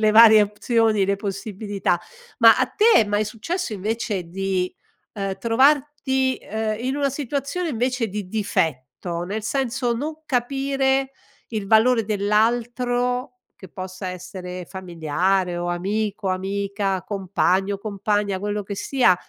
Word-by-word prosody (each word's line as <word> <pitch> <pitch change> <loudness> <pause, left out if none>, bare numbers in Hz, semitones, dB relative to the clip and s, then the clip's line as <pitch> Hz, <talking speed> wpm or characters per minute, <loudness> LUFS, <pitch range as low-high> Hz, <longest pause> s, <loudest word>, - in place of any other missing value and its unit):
le 215 -1 +4
varie 220 -1 +8
opzioni, 215 0 +1
le 200 - +1
possibilità. 200 -2 -2 0.4
Ma - - +7
a - - +3
te 440 +2 +3
è - - -2
mai 205 +1 0
successo 245 - -4
invece 210 -2 -2
di, 185 +1 -2 0.4
uhm, 195 -2 -3
trovarti, 265 +2 +2
ehm, 220 0 -2
in 260 +3 -2
una 285 -1 +1
situazione 285 +5 -3
invece 250 -2 -1
di 205 0 -5
difetto, 170 - -2
nel 205 +4 -4
senso 245 -1 0
non 310 +6 -5
capire 270 +1 0 0.4
il 210 -4 -3
valore 225 +1 +5
dell'altro, 245 +5 0 0.3
che 190 - -10
possa 185 +1 -7
essere 180 0 -7
familiare 180 +1 -1
o 175 0 -2
amico, 200 +3 -2
amica, 195 0 -1
compagno, 195 0 0
compagna, 205 -1 -1
quello 205 +1 -2
che 200 +1 -6
sia 245 -3 +3
210 Hz, 130 wpm, -23 LUFS, 190-245 Hz, 0.4 s, varie